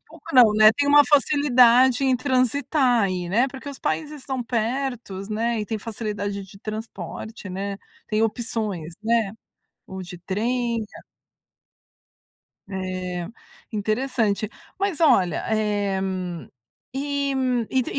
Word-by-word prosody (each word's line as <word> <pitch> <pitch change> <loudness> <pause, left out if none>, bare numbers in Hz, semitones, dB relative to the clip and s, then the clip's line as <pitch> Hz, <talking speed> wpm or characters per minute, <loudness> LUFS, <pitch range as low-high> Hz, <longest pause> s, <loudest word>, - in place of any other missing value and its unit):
Pouco 320 -1 -17
não, 240 -4 +8
né. 215 0 +8
Tem 285 +5 0
uma 290 0 +8
facilidade 260 -3 +5
em 260 -1 +3
transitar 255 -1 +2
aí, 185 -3 -1
né? 235 +8 +3
Porque 265 +2 -9
os 280 - -8
países 300 -2 -3
estão 260 -2 -3
pertos, 230 -4 -3
né? 225 +1 -1
E 210 - -4
tem 220 0 -3
facilidade 205 -2 -4
de 195 +1 -14
transporte, 215 -1 -7
né, 195 +2 -4 0.3
tem 215 0 0
opções, 215 -7 -2
né? 225 -3 +2 0.6
Ou 190 0 -7
de 180 0 -9
trem 230 +5 -1 1.9
Eh, 185 -2 -4 0.5
interessante. 215 -1 0 0.3
Mas 390 -4 -1
olha, 195 - +3
eh, 205 -2 0
hum, 185 -3 -4 0.5
eh, 280 0 -1
hum, 250 -3 0
e 260 -2 +2
225 Hz, 125 wpm, -24 LUFS, 200-260 Hz, 1.9 s, não